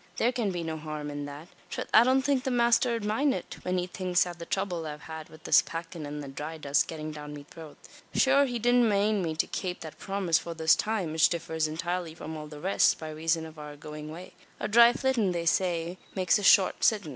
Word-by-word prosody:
Thare 240 - +2
can 235 -4 -1
be 175 -2 -3
no 160 -1 -4
harum 150 -1 -5
in 145 0 -5
that. 145 +3 -9 0.2
Trath, - - -4
I 220 - +8
don't 260 +2 +3
think 275 -2 +1
the 265 - -1
masther 240 0 +3
'ud 225 -3 -4
mind 265 +6 +1
it - - -7
when 180 0 -1
he 180 - 0
thinks 180 -1 0
av 175 -1 -8
the 170 - -8
throuble 180 -5 -2
I've 150 0 -7
had 160 -1 -8
wid 155 - -15
this - - +6
packin', 165 -2 -7
an 150 +1 -5
the 140 - -7
dhry 150 +4 -6
dust 140 -1 +1
gettin' 155 -1 -6
down 150 -1 -8
me 145 -1 -10
throat. 160 -3 -11 0.4
Shure 275 +1 +5
he 245 -2 -3
didn't 245 0 +3
mane 205 0 +2
me 160 -3 -2
to 160 - +1
kape 180 -2 -4
that 160 -2 -9
promise 195 -4 0
for 170 -1 -7
this 160 0 +4
time 210 -7 -2
which 160 0 +4
differs 160 -2 -2
intirely 170 +1 -3
from 160 0 -7
all 150 -1 -7
the 150 -1 -10
rest, 190 +5 +3
by 155 -1 -7
razon 160 +1 -1
av 160 -1 -11
our 150 -1 -8
goin' 150 +1 -8
away. 170 +4 -9 0.3
A - - -2
dhry 235 +2 +7
flittin', 240 -8 +1
they 170 -1 -2
say, 175 0 0 0.2
makes 185 +1 +2
a - - -5
short 195 -1 +5
sittin'. 205 -7 +2
170 Hz, 240 wpm, -28 LUFS, 155-210 Hz, 0.4 s, I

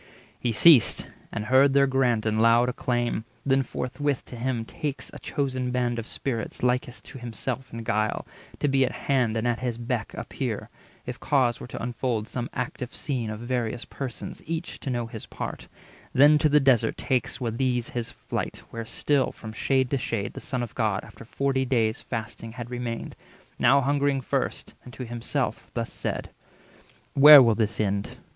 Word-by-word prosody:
He 120 - 0
ceased, 135 +2 +6 0.3
and 105 - -3
heard 135 +3 +5
their 140 0 +5
grant 125 -5 +2
in 110 0 +1
loud 115 +2 +5
acclaim; 120 -2 -1 0.2
Then 135 -1 +3
forthwith 135 +2 -2
to - - -10
him 120 -1 -2
takes 145 +3 -5
a - - -8
chosen 130 -3 -2
band 120 -1 0
Of 115 - -6
Spirits 120 -4 -4
likest 125 0 0
to 135 - -10
himself 125 +2 -5
in 115 0 -6
guile, 110 0 0 0.4
To - - +3
be 135 -1 +3
at 130 - 0
hand 125 -5 +2
and 110 +2 0
at 120 -1 0
his 125 -2 -2
beck 120 -1 -3
appear, - - -4 0.3
If 125 0 -6
cause 130 -5 +2
were - - -8
to 115 - -6
unfold 120 -2 -2
some 120 +1 -4
active 125 0 -4
scene 125 -7 -2
Of 110 +1 -5
various 120 -2 -2
persons, 130 -4 -6
each 165 +2 -4
to 140 - -5
know 120 -2 -1
his 115 -1 -9
part; - - -6 0.5
240 - - -6
Then 145 +3 +8
to 155 - +3
the 150 +1 +5
desert 125 -5 +3
takes 130 -1 -1
with 115 -2 -3
these 125 -3 0
his 120 -1 -3
flight, - - -4
Where 115 -1 -5
still, 135 +3 +1
from 110 -1 -9
shade 130 +2 +1
to 140 - +1
shade, 115 -5 -2
the - - -7
Son 125 -3 -2
of 120 - -6
God, 105 -4 0
After - - -12
forty 135 +2 0
days' 115 -3 +1
fasting, 115 -1 -6
had 120 -1 -7
remained, 120 -2 -4 0.4
Now 140 +1 +5
hungering 140 0 +1
first, - - -2
and 125 - -11
to 125 +3 -6
himself 120 0 -3
thus - - -3
said:— - - -4 0.8
"Where 145 0 +11
will 115 -2 +4
this 110 -1 -1
end? 100 -1 -1
125 Hz, 185 wpm, -26 LUFS, 115-135 Hz, 0.8 s, Where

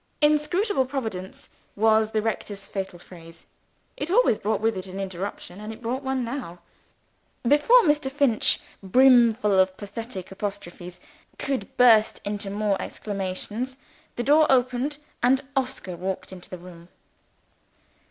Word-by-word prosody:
"Inscrutable 300 - +2
Providence" 220 -9 -5 0.3
was 220 0 +3
the 215 -1 -1
rector's 205 -3 -3
fatal 190 -3 -5
phrase 165 -1 -14 0.5
it 295 - -4
always 400 - +3
brought 215 0 0
with 225 0 +1
it 185 0 -5
an 190 +1 -7
interruption; 190 0 -6
and 215 +1 -6
it 220 - -10
brought 245 +3 -3
one 265 -2 -1
now. 235 -8 -5 0.9
Before 295 - +6
Mr. 295 -4 +2
Finch 270 -5 +3 0.2
(brimful 235 0 +5
of 185 0 +2
pathetic 205 -2 -7
apostrophes) 180 -3 -6 0.4
could 265 -8 -4
burst 225 -3 +5
into 205 -1 -3
more 205 0 0
exclamations, 205 +6 -4 0.4
the 240 - -2
door 300 +4 +5
opened, 255 +3 +1 0.2
and 260 +2 +4
Oscar 255 -9 -2
walked 185 +2 -4
into 185 -1 -11
the 185 - -7
room. 175 -1 -13
220 Hz, 135 wpm, -25 LUFS, 190-265 Hz, 0.9 s, Before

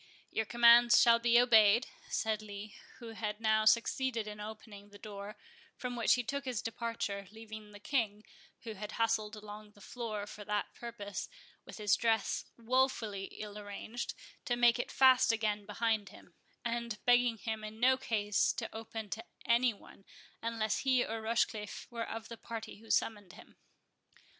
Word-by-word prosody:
"Your 220 - 0
commands 235 +1 +7
shall 235 -1 +6
be 235 0 +5
obeyed," 230 -1 +6 0.2
said 220 -1 0
Lee, 205 0 -8 0.2
who 235 - -9
had 215 -2 -4
now 220 -1 +2
succeeded 230 +1 +2
in 210 0 -8
opening 210 -1 -9
the 205 - -13
door; 205 0 -8 0.4
from 250 -1 -4
which 235 -2 +4
he 245 - -1
took 280 +3 -3
his 250 -4 -2
departure, 225 -4 -3
leaving 220 -1 -10
the 205 - -12
King, 215 -4 -1 0.4
who 225 -2 -5
had 210 +1 -7
hustled 225 -2 0
along 210 0 -10
the 205 - -19
floor 215 -1 -5
for 210 0 -9
that 210 0 -2
purpose, 210 -4 -6 0.4
with - - -10
his 210 -2 +3
dress 225 -2 0
wofully 230 -4 0
ill 210 +1 -8
arranged, 210 +3 -6 0.3
to 245 - +1
make 240 0 +4
it - - -3
fast 260 -1 +6
again 210 -2 -1
behind 215 -1 0
him, 180 - -16 0.3
and 235 -1 -2
begging 245 -1 +4
him 220 0 -4
in 215 +1 -8
no 260 +2 +5
case 220 -6 +1
to 225 - -6
open 225 -1 -6
to 225 - -4 0.2
any 235 +1 +4
one, 200 -1 -16 0.4
unless 225 -2 -1
he 260 -2 +2
or 225 0 -4
Rochecliffe 220 -1 -1
were 230 -1 -4
of 225 0 -6
the 230 - -8
party 225 -1 -7
who 225 +1 -16
summoned 205 -5 0
him. - - -15
220 Hz, 165 wpm, -33 LUFS, 210-235 Hz, 0.4 s, commands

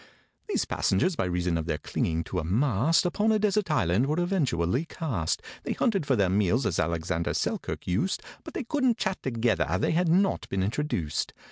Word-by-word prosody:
These - - +1
passengers, 185 -2 +1
by - - 0
reason 90 -1 0
of 80 - -4
their 80 - 0
clinging 80 +2 -1
to 90 - -3
a - - -3
mast, 125 - +2
Upon 205 +5 +2
a 215 - +4
desert 210 -2 +1
island 115 - +2
were 155 +4 0
eventually 140 - +1
cast. 130 - -2 0.2
They - - -2
hunted 195 - 0
for 135 - +3
their 100 -4 +3
meals, 105 +6 +2
as 85 - 0
ALEXANDER 85 +1 -1
SELKIRK - - -2
used, 100 - 0 0.2
But - - -10
they - - -2
couldn't 255 -2 +1
chat 190 -4 -2
together—they 110 - 0
had 170 +1 +2
not 190 +4 +2
been 95 -1 0
introduced. 100 - -2
120 Hz, 180 wpm, -27 LUFS, -, 0.2 s, a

